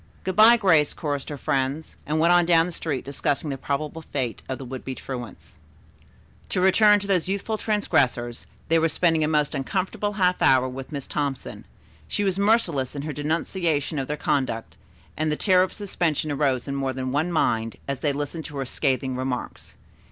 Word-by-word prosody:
"Good 185 -1 -2
bye, 225 +3 +8
Grace," 165 -9 +3
chorused 145 -3 -3
her 145 - -5
friends, 135 +4 -2
and 155 +2 0
went 170 +2 +5
on 175 -1 +4
down 165 -1 +5
the 180 - -5
street 155 -5 -3
discussing 145 +1 -2
the 135 - -3
probable 150 +4 -3
fate 130 -6 -4
of 130 - -2
the 135 - -8
would 130 +1 -7
be 130 - -5
truants. 125 -4 -8 0.9
To - - -1
return 205 +3 +5
to - - -6
those 185 -3 +1
youthful 200 +3 -2
transgressors. 140 - 0 0.2
They 165 0 +3
were 165 0 +2
spending 165 0 +2
a - - +2
most 150 -1 +1
uncomfortable 190 +8 -2
half 180 -3 +1
hour 130 -1 +5
with 130 +2 -7
Miss 140 -3 -5
Thompson. 140 -3 -4 0.4
She 205 - -1
was 195 -1 0
merciless 190 - +2
in 140 - -4
her 150 0 -4
denunciation 155 0 -1
of 135 - -3
their 150 - -3
conduct, 130 -7 -1 0.4
and 155 0 0
the - - +1
terror 185 +2 +4
of 185 - +1
suspension 170 -7 -2
arose 135 -3 0
in 140 - -3
more 135 -1 -1
than 130 0 -3
one 155 +6 0
mind, 115 -8 0
as 140 -2 -3
they 145 - +1
listened 145 +3 -4
to 145 - -7
her 135 - -2
scathing 130 0 -1
remarks. 130 -1 -5
150 Hz, 195 wpm, -24 LUFS, 135-175 Hz, 0.9 s, bye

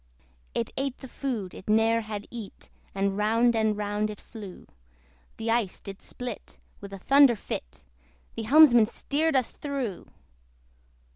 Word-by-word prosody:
It 115 - -2
ate 270 -1 -2
the 265 - -10
food 240 -8 -4
it 190 - -10
ne'er 225 +1 +3
had 210 -2 -6
eat, 225 -5 -9 0.2
And 195 0 0
round 230 +3 +2
and 220 -2 +1
round 210 +1 -1
it 210 - -7
flew. 205 -5 -11 0.7
The 225 0 -1
ice 225 -5 0
did 195 -1 -9
split 250 0 -8 0.2
with 200 -1 -10
a 195 - -6
thunder 275 +4 +5
fit; 65 - -7 0.5
The - - -3
helmsman 245 -4 +7
steered 305 +6 -1
us 255 -3 +2
through! 270 - -4
225 Hz, 145 wpm, -27 LUFS, 205-250 Hz, 0.7 s, helmsman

